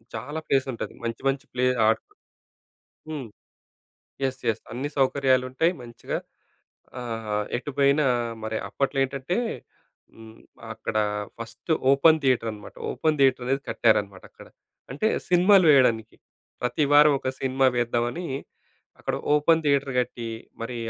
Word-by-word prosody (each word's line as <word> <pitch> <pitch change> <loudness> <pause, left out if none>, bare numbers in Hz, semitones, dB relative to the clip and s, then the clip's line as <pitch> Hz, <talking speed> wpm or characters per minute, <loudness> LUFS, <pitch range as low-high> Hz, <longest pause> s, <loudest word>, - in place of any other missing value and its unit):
చాలా 145 +8 -5
ప్లేస్ 135 -1 +2
ఉంటది. - - -6
మంచి 115 -1 -4
మంచి 135 0 -3
ప్లే 125 0 +1 0.2
ఆడుకో 410 - 0 1.0
హ్మ్. 145 -6 -5 1.0
యస్! 130 0 -2
యస్! 115 0 -1
అన్ని 130 +5 -3
సౌకర్యాలు 130 -1 +3
ఉంటాయి 160 +7 +2
మంచిగా. 120 -1 -5 0.8
ఆహ్, 110 -3 -3
ఎటు 135 +4 -6
పోయినా 140 +1 +4 0.4
మరి 110 0 -2
అప్పట్లో 135 +2 -1
ఏంటంటే, 140 - -3 0.8
హ్మ్. 110 0 -13 0.4
అక్కడ 110 - -4 0.4
ఫస్ట్ 115 +8 -7 0.2
ఓపెన్ 155 +3 +5
థియేటర్ 125 -4 +2
అనమాట. 105 - -12 0.2
ఓపెన్ 155 -1 0
థియేటర్ 130 -2 +3
అనేది 135 +1 0
కట్టారనమాట 100 -4 +1
అక్కడ. - - -15 0.4
అంటే 145 +11 0 0.2
సినిమాలు 180 +1 +5
వేయడానికి, 115 -5 +3 0.5
ప్రతి 125 +5 0
వారం 150 0 +7
ఒక - - -5
సినిమా 130 0 +2
వేద్దామని, 120 +7 -1 0.7
అక్కడ - - -2 0.2
ఓపెన్ 160 +2 +4
థియేటర్ 140 -2 +1
గట్టి, 120 -1 -3 0.4
మరి 120 +2 -4
130 Hz, 125 wpm, -25 LUFS, 115-145 Hz, 1.0 s, వారం